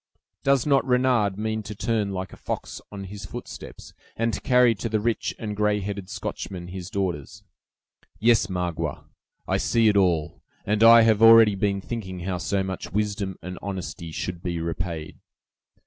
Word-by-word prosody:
Does 135 -2 +2
not 140 -2 +3
Renard 125 -6 +2
mean 110 +1 -2
to 105 0 -8
turn 105 0 -1
like 95 -1 -5
a - - -8
fox - - -5
on 100 -1 -7
his 100 +1 -8
footsteps, - - -9 0.2
and 115 0 0
to - - -3
carry 125 -2 +4
to 115 +2 -4
the 110 0 +1
rich 115 +1 -1
and 105 -2 -4
gray 105 0 +1
headed 100 -1 -5
Scotchman 100 -3 -6
his 90 -1 -7
daughters? 95 0 -3 0.7
Yes, 115 -3 +3
Magua, 90 -3 -3 0.4
I - - +1
see 115 -2 +3
it 105 - +1
all, 85 -5 +1 0.2
and 105 +1 0
I 115 0 +9
have 110 -1 +3
already 115 -2 +8
been 100 0 0
thinking 95 -5 -6
how 90 0 -3
so 100 +1 0
much 95 -1 -5
wisdom 100 -1 -2
and 90 +1 -6
honesty 95 -4 -5
should 90 +2 -4
be 85 -2 -3
repaid. 85 -1 -4
100 Hz, 170 wpm, -25 LUFS, 95-110 Hz, 0.7 s, I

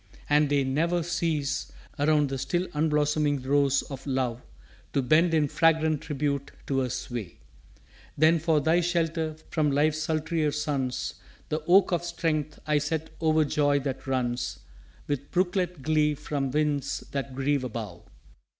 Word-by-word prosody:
And 150 0 +3
they 140 -1 +2
ne'er 165 +6 +1
cease 155 -4 -1 0.3
Around 150 -1 +3
the 135 0 -3
still 175 +7 -1
unblossoming 150 -2 +1
rose 140 0 +3
of 135 0 -9
love 130 -3 -1 0.5
To 140 - +1
bend 160 +6 +4
in 150 -2 +3
fragrant 160 0 +2
tribute 140 -2 -2 0.2
to 135 -1 0
her 130 -1 0
sway. 115 -6 -5 0.8
Then 160 +3 +5
for 160 -1 +2
thy 160 +4 +3
shelter 165 -2 0 0.2
from 155 -2 +2
life's 150 +2 +2
sultrier 155 0 0
suns, 140 -4 -2 0.4
The 155 +1 -1
oak 190 +2 +5
of 175 -1 0
strength 160 -3 -2
I 150 -1 +2
set 155 +2 -3
o'er 155 -1 +3
joy 145 0 +2
that 135 0 -4
runs 125 -2 -2 0.4
With 145 -1 -3
brooklet 180 -4 0
glee 150 0 +2
from 140 -1 -3
winds 145 0 0
that 135 -2 -4
grieve 135 0 0
above. 115 -4 -6
150 Hz, 145 wpm, -27 LUFS, 140-160 Hz, 0.8 s, Then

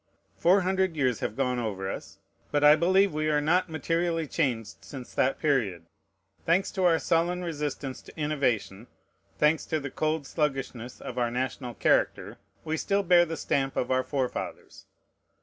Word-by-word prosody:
Four 185 +4 +4
hundred 190 -1 0
years 130 -5 +1
have 105 - -3
gone 125 -2 0
over 100 -5 -3
us; - - -7 0.3
but 145 0 +1
I 150 +1 +9
believe 190 +3 +3
we 155 0 0
are 150 -1 +3
not 175 +5 +2
materially 165 +1 -1
changed 125 -8 -2
since 130 -3 -9
that 135 +1 +1
period. 110 - 0 0.6
Thanks 175 +4 +2
to 190 -2 0
our 165 -2 +5
sullen 175 +2 0
resistance 145 -5 -4
to - - -14
innovation, 125 -8 -1 0.5
thanks 150 +1 +3
to 160 - 0
the 145 -1 -6
cold 155 -1 -1
sluggishness 135 -5 -3
of - - -5
our 120 -1 +1
national 125 0 -3
character, - - +1 0.3
we 160 0 -1
still 200 +3 0
bear 175 -1 +5
the 165 -1 -5
stamp 135 -1 -1
of 125 - -1
our 130 0 +2
forefathers. 130 -3 -4
150 Hz, 165 wpm, -27 LUFS, 130-165 Hz, 0.6 s, I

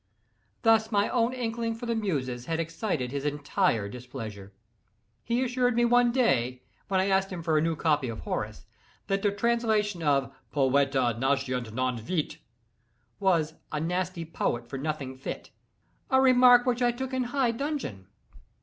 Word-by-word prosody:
Thus 225 0 +4
my 205 -1 +2
own 235 -1 +2
inkling 230 -2 -2
for 230 - -7
the 235 - 0
Muses 135 - -2
had 165 0 -1
excited 165 - -2
his 140 0 -3
entire 145 - 0
displeasure. 110 -4 -8 0.7
He 235 +2 0
assured 250 -1 +1
me 240 0 +3
one 245 0 +4
day, 130 - +1 0.2
when 190 -1 +1
I 190 - +2
asked 195 0 +2
him 175 -3 -5
for 160 -1 +1
a 155 - +4
new 165 0 0
copy 150 -5 +1
of 110 - -6
Horace, - - -4 0.4
that 195 0 0
the 205 - +3
translation 215 -3 +1
of 140 -5 +1 0.2
"Poeta 135 -3 +2
nascitur 130 -3 0
non 130 +1 -1
fit" 155 +8 -3 0.8
was 165 -5 +2 0.2
"a 150 - -1
nasty 180 +1 -2
poet 120 -7 -2
for 135 +2 -5
nothing 135 -3 -4
fit"—a 265 - -5
remark 250 -2 +6
which 250 -1 0
I 240 -1 +4
took 260 +2 -5
in 260 -1 0
high 250 -1 +1
dudgeon. 235 - -4
170 Hz, 160 wpm, -28 LUFS, -, 0.8 s, remark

